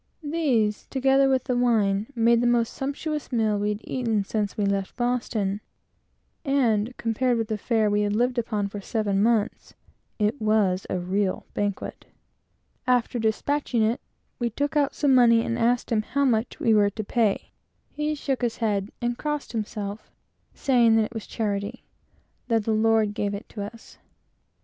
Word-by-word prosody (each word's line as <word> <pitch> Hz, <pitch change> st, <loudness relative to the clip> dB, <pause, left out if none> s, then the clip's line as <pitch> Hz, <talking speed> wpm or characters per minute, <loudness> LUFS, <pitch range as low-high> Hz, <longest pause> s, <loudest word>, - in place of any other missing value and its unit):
These, 270 Hz, -9 st, 0 dB
together 270 Hz, 0 st, +3 dB
with 260 Hz, -2 st, +2 dB
the 250 Hz, -, -1 dB
wine, 220 Hz, -4 st, +2 dB
made 230 Hz, 0 st, +4 dB
the 245 Hz, -, +2 dB
most 235 Hz, -1 st, +2 dB
sumptuous 290 Hz, +2 st, -4 dB
meal 220 Hz, -4 st, +1 dB
we 205 Hz, +1 st, 0 dB
had 210 Hz, +1 st, -3 dB
eaten 230 Hz, -5 st, -1 dB
since 205 Hz, 0 st, -2 dB
we 205 Hz, -, +1 dB
left 200 Hz, -1 st, -1 dB
Boston; 225 Hz, -5 st, -1 dB, 0.8 s
and, 250 Hz, -5 st, +1 dB
compared 240 Hz, +2 st, 0 dB
with 225 Hz, -1 st, -2 dB
the 215 Hz, -, -1 dB
fare 220 Hz, 0 st, +1 dB
we 205 Hz, 0 st, +2 dB
had 205 Hz, 0 st, 0 dB
lived 245 Hz, +2 st, +1 dB
upon 215 Hz, -3 st, -1 dB
for 200 Hz, 0 st, -7 dB
seven 200 Hz, -2 st, 0 dB
months, 220 Hz, -1 st, 0 dB, 0.4 s
it 215 Hz, +5 st, 0 dB
was 210 Hz, -4 st, +2 dB
a -, -, -1 dB
regal 185 Hz, +2 st, -1 dB
banquet. 205 Hz, -1 st, -3 dB, 0.8 s
After 245 Hz, -1 st, +2 dB
despatching 235 Hz, +2 st, 0 dB
our 215 Hz, -, +4 dB
meal, 235 Hz, -, -1 dB, 0.4 s
we 240 Hz, -1 st, 0 dB
took 285 Hz, +6 st, -2 dB
out 285 Hz, -2 st, +2 dB
some 285 Hz, -3 st, +3 dB
money 235 Hz, -2 st, +5 dB
and 230 Hz, -, -1 dB
asked 240 Hz, +1 st, +1 dB
him 220 Hz, -2 st, +3 dB
how 280 Hz, +6 st, 0 dB
much 230 Hz, -2 st, 0 dB
we 225 Hz, -, +3 dB
were 205 Hz, -1 st, +4 dB
to 215 Hz, +2 st, -5 dB
pay. 215 Hz, -1 st, 0 dB, 0.4 s
He 300 Hz, +1 st, -2 dB
shook 275 Hz, -3 st, -2 dB
his 235 Hz, -2 st, -1 dB
head, 210 Hz, -3 st, -1 dB
and 240 Hz, 0 st, -1 dB
crossed 295 Hz, -1 st, -3 dB
himself, 210 Hz, -2 st, -5 dB, 0.5 s
saying 240 Hz, -5 st, +4 dB
that 225 Hz, -, +4 dB
it 225 Hz, -, -9 dB
was 225 Hz, -2 st, -6 dB
charity: 210 Hz, +1 st, -3 dB, 0.6 s
that 225 Hz, -3 st, +2 dB
the 220 Hz, -, 0 dB
Lord 220 Hz, -1 st, +3 dB
gave 205 Hz, -1 st, -2 dB
it 200 Hz, -, -8 dB
to 210 Hz, -, -7 dB
us. 225 Hz, +3 st, -11 dB
225 Hz, 175 wpm, -25 LUFS, 210-245 Hz, 0.8 s, money